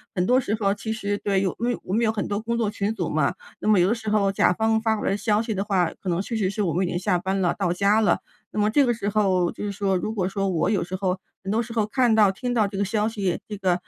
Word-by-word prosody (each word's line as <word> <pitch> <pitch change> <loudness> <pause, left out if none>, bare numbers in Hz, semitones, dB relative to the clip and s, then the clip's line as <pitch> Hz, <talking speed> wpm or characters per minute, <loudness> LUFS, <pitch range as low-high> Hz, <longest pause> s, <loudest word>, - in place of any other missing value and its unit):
很 180 -1 +1
多 250 +6 +4
时 220 -4 -1
候 200 -2 +2
其 220 +2 -5
实 205 -2 -2
对， 195 -2 +1
有 190 -3 0
规 240 +1 -1
我 185 - -5
们 230 +3 +2
有 220 - +3
很 215 -2 -3
多 205 0 -1
工 235 +1 -2
作 225 -3 +1
群 205 0 -1
组 - - -2
嘛， - - +1 0.2
那 - - -4
么 215 -3 +5
有 180 +2 +4
的 - - +3
时 220 -2 -5
候 205 -2 +2
甲 195 - +3
方 220 +2 +1
发 220 -1 +1
回 - - -1
的 - - +1
消 210 0 +1
息 225 -1 -3
的 195 -1 -1
话， 190 -5 +1
可 190 - -3
能 170 0 0
确 230 +4 -4
实 205 -4 +1
是 200 +2 -3
我 170 -5 0
们 185 +2 +1
已 - - -2
经 175 - -2
下 180 -1 +1
班 190 +2 -1
了， 180 -2 +2
到 190 -4 -1
家 200 +4 +3
了。 210 - +3 0.3
那 - - -3
么 210 0 +3
这 285 +5 +4
个 240 - +2
时 210 -3 -3
候 190 -4 +2
就 - - -6
是 205 - -2
说 195 -1 0
如 215 +4 -3
果 190 -4 -1
说 195 +1 -1
我 170 -3 +1
有 205 - +1
时 180 +2 -5
候 185 -1 -1 0.2
很 195 - -3
多 225 +2 +2
时 230 0 -7
候 220 -3 +1
看 240 0 +2
到、 210 -3 +5
听 245 +5 -3
到 225 -3 +3
这 200 -1 -6
个 200 - +1
消 210 +2 0
息， 200 -6 -2
这 210 - -5
个， 185 -3 +1
205 Hz, 340 characters per minute, -24 LUFS, 190-220 Hz, 0.3 s, 么